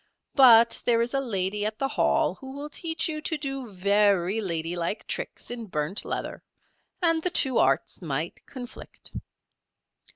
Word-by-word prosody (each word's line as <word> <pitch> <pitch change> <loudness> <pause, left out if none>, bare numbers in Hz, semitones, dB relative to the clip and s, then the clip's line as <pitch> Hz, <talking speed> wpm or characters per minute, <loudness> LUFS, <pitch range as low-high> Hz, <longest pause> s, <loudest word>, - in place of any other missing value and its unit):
"But 235 -4 +7
there 235 -1 +3
is 245 - -3
a 275 - +2
lady 205 -4 -1
at 215 +1 -2
the 270 +2 -1
Hall - - +2
who 265 -1 -10
will 290 +2 -7
teach 325 0 -1
you 305 -2 -4
to 315 +1 -2
do 270 -5 -5
very 200 +1 +2
ladylike 170 +1 -2
tricks - - -4
in 235 -2 -5
burnt 150 +2 -2
leather, - - -4 0.6
and 330 -1 +3
the 360 - 0
two 265 -7 +3
arts 135 +7 +1
might 155 0 -4
conflict. 250 -2 -10
225 Hz, 155 wpm, -26 LUFS, 185-270 Hz, 0.6 s, But